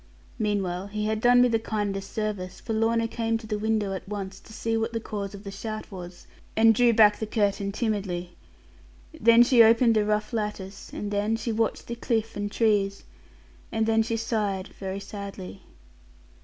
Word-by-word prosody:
Meanwhile 195 -3 -1
he 210 +1 -3
had 215 0 -1
done 245 +1 +6
me - - +5
the 230 -2 +1
kindest 205 -3 -3
service; 210 -4 -3
for 225 - -4
Lorna 230 +1 +2
came 225 0 -1
to 225 - -11
the 210 -1 -3
window 215 -2 0
at 190 0 -7
once, 195 -2 -5
to - - -17
see 225 +1 -2
what 225 +1 -1
the 230 - -1
cause 205 -3 -5
of 200 - -11
the 200 - -7
shout 215 +2 -6
was, 180 -2 -9 0.3
and 225 0 +6
drew 240 +2 +4
back 215 -2 +5
the 220 - -3
curtain 200 -2 0
timidly. 195 -6 -2 0.8
Then 235 -6 +6
she 245 -1 +5
opened 230 +1 +6
the 215 - +3
rough 210 +2 -1
lattice; 210 -3 -4
and 205 0 -5
then 205 +2 +1
she 230 +1 -3
watched 225 0 -1
the 235 - -5
cliff 225 -2 -1
and 205 0 -3
trees; 205 -3 +1 0.7
and 220 -1 +1
then 225 0 +3
she 225 +1 -1
sighed 210 -4 -2
very 190 0 -6
sadly. 200 - -8
215 Hz, 185 wpm, -26 LUFS, 200-225 Hz, 0.8 s, done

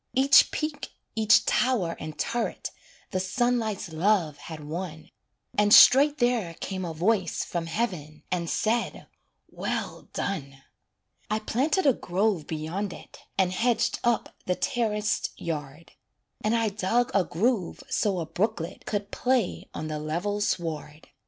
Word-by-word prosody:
Each 270 +2 +7
peak, 305 -1 -4 0.2
each 220 0 +4
tower 225 -10 +1
and 155 0 -7
turret 235 0 -2 0.4
The 185 - 0
sunlight's 215 -2 -1
love 170 -3 +2
had 155 +1 -8
won, 160 +1 -6 0.4
And 205 0 +3
straight 285 +6 +8
there 240 - +1
came 190 +2 -4
a 170 - -3
voice 190 +1 +1
From 170 -1 -3
heaven 165 -6 -3
and 170 -2 -1
said 230 +2 -1 0.5
"well - - -4
done." 140 -8 -4 0.7
I 215 - +1
planted 275 - 0
a 275 - +6
grove 190 -4 0
beyond 165 +5 -3
it, - - -13 0.2
And 190 -2 +3
hedged 230 +2 +1
up 240 -1 0
the 180 - +2
terraced 220 -6 -1
yard, 150 -1 -5 0.5
And 215 +2 +2
I 225 -1 +2
dug 225 +5 0
a 200 - +4
groove 205 +1 -1
so 200 -4 0
a 165 - -2
brooklet 180 0 -3
Could 205 -1 -2
play 250 -6 0
on 155 - -5
the 155 -1 -3
level 175 +7 -2
sward. 160 -5 -3
200 Hz, 140 wpm, -27 LUFS, 165-230 Hz, 0.7 s, straight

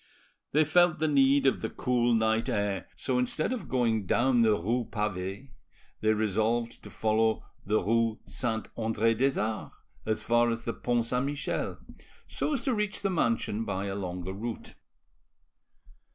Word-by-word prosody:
They 155 +2 +4
felt 175 +2 +4
the 155 +1 +1
need 140 -1 +4
of 135 - +2
the - - -2
cool 120 -2 +1
night 110 0 +1
air, 100 -3 -1
so 130 -2 -1
instead 140 - 0
of 195 - -6
going 115 -5 +1
down 120 +2 +3
the 110 -2 +5
rue 115 +6 -1
Pavee 105 +3 -3 0.5
they 110 - +2
resolved 110 +3 0
to - - -11
follow 110 0 +1 0.2
the 105 +2 +1
rue 115 +2 +1
Saint 110 -4 -2
Andre 115 0 +1
des 135 +4 +1
Arts 110 0 -3 0.3
as 110 0 0
far 120 0 +3
as 115 0 -2
the 115 - -2
Pont 120 -1 0
Saint 125 +3 0
Michel, 145 0 -3 0.5
so 305 - -2
as 265 - -1
to 265 - +1
reach 210 -2 -2
the 195 - +1
mansion 115 - 0
by 100 -2 -3
a 100 - -3
longer 90 -1 -4
route. 115 +3 -6
115 Hz, 165 wpm, -29 LUFS, 110-135 Hz, 0.5 s, the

